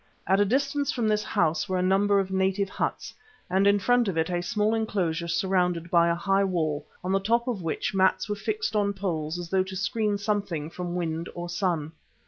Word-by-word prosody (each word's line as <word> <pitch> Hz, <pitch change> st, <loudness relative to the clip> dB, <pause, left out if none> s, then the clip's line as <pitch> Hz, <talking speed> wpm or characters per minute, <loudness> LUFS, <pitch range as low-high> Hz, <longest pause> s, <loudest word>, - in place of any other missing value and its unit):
At 190 Hz, +1 st, +3 dB
a 205 Hz, -, +4 dB
distance 280 Hz, +5 st, 0 dB
from 235 Hz, -3 st, -1 dB
this 210 Hz, 0 st, +1 dB
house 155 Hz, -1 st, 0 dB
were 185 Hz, -, 0 dB
a 180 Hz, -, +1 dB
number 200 Hz, +2 st, +3 dB
of 190 Hz, -1 st, -2 dB
native 190 Hz, +1 st, +1 dB
huts, -, -, -3 dB, 0.4 s
and 190 Hz, +2 st, +3 dB
in 200 Hz, 0 st, +5 dB
front 245 Hz, +3 st, +2 dB
of 185 Hz, -4 st, -2 dB
it 160 Hz, +2 st, 0 dB
a 175 Hz, 0 st, 0 dB
small 210 Hz, +5 st, 0 dB
enclosure 185 Hz, -7 st, -1 dB
surrounded 180 Hz, -1 st, 0 dB
by 170 Hz, -1 st, +5 dB
a 170 Hz, -, +2 dB
high 195 Hz, +3 st, +1 dB
wall, 155 Hz, -6 st, -1 dB, 0.2 s
on 185 Hz, -, -2 dB
the 195 Hz, -, +3 dB
top 235 Hz, +5 st, +1 dB
of 230 Hz, -7 st, -2 dB
which 165 Hz, +2 st, -2 dB
mats 190 Hz, 0 st, +2 dB
were 210 Hz, -, -1 dB
fixed 215 Hz, +1 st, -2 dB
on 200 Hz, -1 st, +2 dB
poles 170 Hz, -5 st, -3 dB
as 175 Hz, -1 st, -7 dB
though 190 Hz, -1 st, +3 dB
to 190 Hz, 0 st, -8 dB
screen 210 Hz, +1 st, 0 dB
something 200 Hz, -7 st, -2 dB
from 175 Hz, 0 st, -5 dB
wind 165 Hz, -1 st, -2 dB
or 175 Hz, 0 st, -5 dB
sun. 170 Hz, -4 st, -1 dB
190 Hz, 215 wpm, -26 LUFS, 170-205 Hz, 0.4 s, in